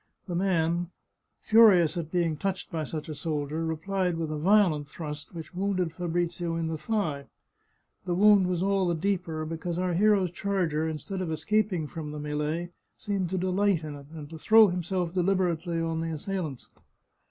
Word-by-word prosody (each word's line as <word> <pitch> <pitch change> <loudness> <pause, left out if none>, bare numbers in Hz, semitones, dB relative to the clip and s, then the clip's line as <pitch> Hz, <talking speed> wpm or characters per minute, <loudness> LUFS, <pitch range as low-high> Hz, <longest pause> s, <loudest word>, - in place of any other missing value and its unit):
The 180 - -5
man, 170 -2 +1 0.5
furious 200 -8 +6
at 165 -3 -4
being 170 -3 +1
touched 190 +4 -3
by 160 -2 -2
such 155 0 -5
a 155 - -5
soldier, 150 +1 -3
replied 175 +2 -1
with 160 -2 -3
a 155 - -2
violent 175 -5 +3
thrust 150 +1 -7
which 160 0 -8
wounded 185 -3 -1
Fabrizio 175 0 -2
in 165 0 -1
the 160 0 -2
thigh. 155 -6 -2 0.8
The 175 -2 0
wound 200 -1 +6
was 180 -1 0
all 195 -1 +2
the 170 - +1
deeper 170 -3 -2
because 165 +2 -4
our 180 0 0
hero's 195 -1 +3
charger, 175 -5 -1
instead 185 +5 -5
of 175 -3 -2
escaping 195 0 0
from 155 0 -6
the 150 - -5
melee, 150 +4 -2 0.3
seemed 195 -4 -2
to 190 - -2
delight 185 -1 +1
in 150 -1 -5
it, 140 -1 -11
and 155 -3 -8
to 160 - -8
throw 220 +4 +7
himself 180 0 -2
de 185 - +1
liberately 175 -2 0
on 165 0 -2
the 165 - -2
assailants. 160 -3 -4
170 Hz, 175 wpm, -28 LUFS, 160-190 Hz, 0.8 s, throw